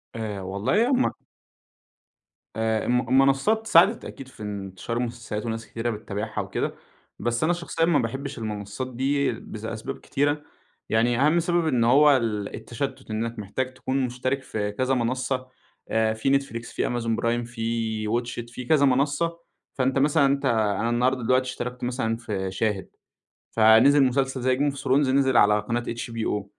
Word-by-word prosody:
آآ 105 -3 -4
والله 100 - +1
هُم 260 -1 +2 1.4
آآ، 110 -1 0
الم 125 0 +2
المنصّات 135 - +3
ساعدت 170 -4 +5
أكيد 135 - -9
في 130 -4 -12
انتشار 100 +2 -5
المسلسلات 115 -3 -4
وناس 115 -1 -4
كتيرة 115 +1 -3
بتتابعها 110 0 -4
وكده، - - -3 0.4
بس 120 +3 -1
أنا 165 +3 +3
شخصيًا 170 -1 -1
ما 165 -4 +3
باحبش 135 +4 -4
المنصّات 105 +2 -4
دي 140 +3 +1
بس 110 0 -8
أسباب 115 +4 -5
كتيرة؛ 145 +1 +1 0.5
يعني 120 +2 +2
أهَم 155 +5 +4
سبب 170 0 +1
إن 125 -6 +2
هو 140 +4 +6
ال 105 -4 -2
التشتُّت، 130 0 -5
إنك 115 +1 -3
محتاج 130 +6 -3
تكون 130 +1 -1
مشترك 130 +2 -2
في 105 -4 -3
كذا 130 +5 0
منصّة، 130 +1 -1 0.4
آآ 110 0 +2
في 135 +5 +2
Netflix 115 -4 -8
في - - -1
amazon 115 -2 -1
prime 120 0 0
في 115 -2 -2
watch 120 +2 -2
it 120 - -16
في 125 - -6
كذا 140 +1 +4
منصّة، 145 +6 +1 0.4
فأنت 130 +1 +1
مثلًا 145 +1 +4
أنت 140 +1 +1
أنا 110 -3 +1
النهارده 125 +1 +1
دلوقتي 130 +2 +3
اشتركت 125 0 -5
مثلًا 120 -2 -1
في 100 -5 -4
شاهد، 100 0 -1 0.6
فنزل 115 +6 +6
مسلسل 130 0 0
زي 130 +1 +2
game 145 0 +1
of - - -11
thrones - - -9 0.2
نزل 135 -1 +3
على 105 -1 +5
قناة 120 +3 -2
HBO، 115 -3 -3
120 Hz, 160 wpm, -25 LUFS, 110-135 Hz, 1.4 s, هو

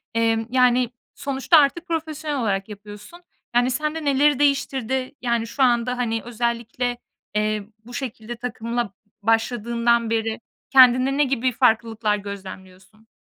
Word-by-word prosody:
emm, 225 0 +1
yani 250 -1 +3 0.3
sonuçta 275 +4 +2
artık 305 +4 +3
profesyonel 310 -3 -3
olarak 195 -2 -1
yapıyorsun. 210 - -11 0.3
Yani 245 +1 +3
sende 305 +3 -2
neleri 285 0 +3
değiştirdi? 265 -2 0
Yani 235 -2 0
şu 265 +4 0
anda, 245 0 +2
hani, 225 -2 -1
özellikle, 240 +1 -2 0.4
eee, 210 -1 0 0.2
bu 245 - -12
şekilde 240 -3 -5
takımla 235 -2 -3 0.3
başladığından 235 +1 +1
beri 225 -1 -1 0.3
kendinde 260 +1 +6
ne 295 - +4
gibi 260 -2 0
farklılıklar 225 -3 +1
gözlemliyorsun? 195 +1 -10
240 Hz, 125 wpm, -23 LUFS, 225-265 Hz, 0.4 s, kendinde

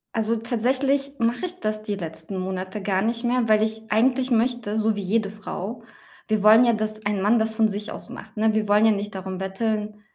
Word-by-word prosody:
Also, 225 +1 +1
tatsächlich 270 +4 0
mache 235 +6 0
ich 360 +1 -4
das 215 0 -1
die 205 -2 -3
letzten 165 +1 -4
Monate 185 +2 -4
gar 190 -1 0
nicht 230 +3 -1
mehr, 240 -2 +1
weil 215 0 +5
ich 220 0 -1
eigentlich 255 +4 +2
möchte, 230 -2 +1
so 220 -1 +1
wie 205 - -3
jede 210 +2 0
Frau 210 +2 -6 0.4
wir 215 -2 +1
wollen 215 +3 +7
ja, 235 - +4
dass 215 -1 -2
ein 205 -2 0
Mann 215 +4 +4
das 220 0 +1
von 220 -1 +2
sich 205 +1 -4
aus - - -6
macht, 220 +1 -11
ne? 220 0 +2
Wir 215 -1 0
wollen 210 +1 +4
ja 225 - +6
nicht 205 0 -3
darum 190 -1 -5
betteln. 210 +2 -3
215 Hz, 220 wpm, -24 LUFS, 205-230 Hz, 0.4 s, wollen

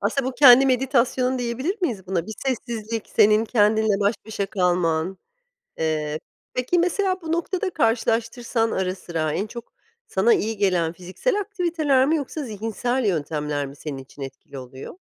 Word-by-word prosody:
Aslında 255 +6 0
bu - - -4
kendi 265 -1 +8
meditasyonun 255 0 +1
diyebilir 260 - -2
miyiz 210 - -2
buna? 180 -2 -1
Bir 220 - -6
sessizlik, 230 -3 -3
senin 215 0 +4
kendinle 215 -2 +2
baş 205 +2 +2
başa 210 -2 -3
kalman... 180 -2 0 0.6
Eee, 155 -1 -1 0.3
peki 255 +8 +1
mesela 370 +2 0
bu 325 -1 -5
noktada 360 +3 -1
karşılaştırsan 230 -2 0
ara 185 0 -1
sıra, 165 -4 -3
en 200 +6 -2
çok 235 +1 -10 0.3
sana 200 +5 +3
iyi 220 +1 -1
gelen 180 -5 +1
fiziksel 185 - -2
aktiviteler 340 -9 +1
mi 310 +4 +2
yoksa 300 +1 -4
zihinsel 225 +2 -2
yöntemler 150 -5 -1
mi 140 0 -10
senin 145 -1 -6
için 135 +2 -12
etkili 135 +1 -9
oluyor? 130 - -9
220 Hz, 150 wpm, -23 LUFS, 180-260 Hz, 0.6 s, kendi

